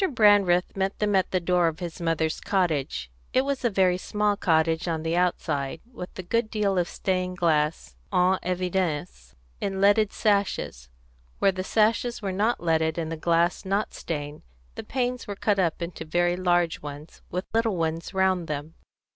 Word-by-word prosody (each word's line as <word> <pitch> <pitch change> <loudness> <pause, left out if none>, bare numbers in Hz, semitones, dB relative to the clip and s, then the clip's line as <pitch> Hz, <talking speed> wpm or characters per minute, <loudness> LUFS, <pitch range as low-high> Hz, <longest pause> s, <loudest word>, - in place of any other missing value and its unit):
Brandreth 205 -5 +4
met 195 0 -1
them 210 -1 +1
at 190 - +2
the 185 - +1
door 180 0 +2
of 160 -1 -2
his 175 -1 -6
mother's 165 -1 0
cottage. 150 - -1 0.2
It 260 +1 +3
was 280 -2 -2
a 240 - +3
very 185 -3 +2
small 210 +1 0
cottage 165 -2 +1
on 160 -2 -1
the 165 +1 0
outside, 160 -5 0
with 180 -7 -8
a 185 - -5
good 230 +5 0
deal 200 -4 +1
of 175 - 0
stained 185 -1 -2
glass 155 -3 0 0.2
en 185 0 +3
évidence 175 - -2 0.2
in 195 -1 -2
leaded 205 +1 +4
sashes; 200 - 0 0.5
where 195 - +3
the 185 0 -4
sashes 225 +4 +1
were 195 -3 -3
not 210 +6 +1
leaded 160 -1 +1
and 165 -1 -3
the - - -2
glass 170 +2 +1
not 200 +2 -1
stained, 145 -2 -5 0.3
the - - -7
panes 250 -1 -2
were 205 - -4
cut 200 0 +1
up 170 -1 0
into 170 -1 -6
very 175 +2 +1
large 175 -2 +1
ones, 145 +2 -9
with 180 +1 -3
little 225 -2 +2
ones 165 0 -2
round 190 -3 +1
them. 150 +1 -4
180 Hz, 175 wpm, -26 LUFS, 165-200 Hz, 0.5 s, Brandreth